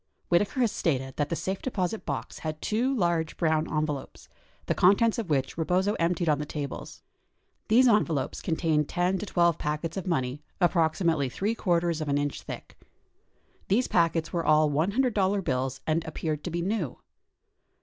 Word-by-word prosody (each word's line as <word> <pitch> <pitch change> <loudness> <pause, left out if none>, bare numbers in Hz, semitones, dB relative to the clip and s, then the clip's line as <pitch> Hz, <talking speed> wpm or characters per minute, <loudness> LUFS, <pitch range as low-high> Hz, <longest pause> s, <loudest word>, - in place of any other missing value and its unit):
Whitaker 200 +9 +2
has 235 -4 +3
stated 135 -8 -1
that 145 -1 0
the - - -1
safe 190 +3 -3
deposit 210 -4 -2
box - - -4
had 155 -1 -4
two 235 +9 0
large 170 - 0
brown 160 -2 +1
envelopes, 150 -3 -3 0.4
the - - +1
contents 215 +5 +4
of 215 -7 -4
which 135 +1 0
Rebozo 185 +5 +1
emptied 170 0 +1
on 150 -2 +3
the 150 - -3
tables. 145 -3 -6 0.6
These 250 +4 +5
envelopes 175 - +1
contained 160 -3 0
10 180 +1 +1
to 210 - -5
12 170 -3 +2
packets 155 +4 -3
of 190 - -4
money 130 -4 -1 0.2
approximately 165 -4 +2
three 205 - -1
quarters 170 -6 0
of 155 - -3
an 140 - +2
inch 145 0 -2
thick. - - -9 0.9
These 230 +6 +2
packets 165 -1 +1
were 170 -1 0
all 155 -1 +4
$100 200 - +1
bills 130 -3 -2
and 160 +1 +1
appeared 155 -1 -3
to - - -2
be 170 0 -2
new. 190 - -2
170 Hz, 165 wpm, -27 LUFS, 150-190 Hz, 0.9 s, These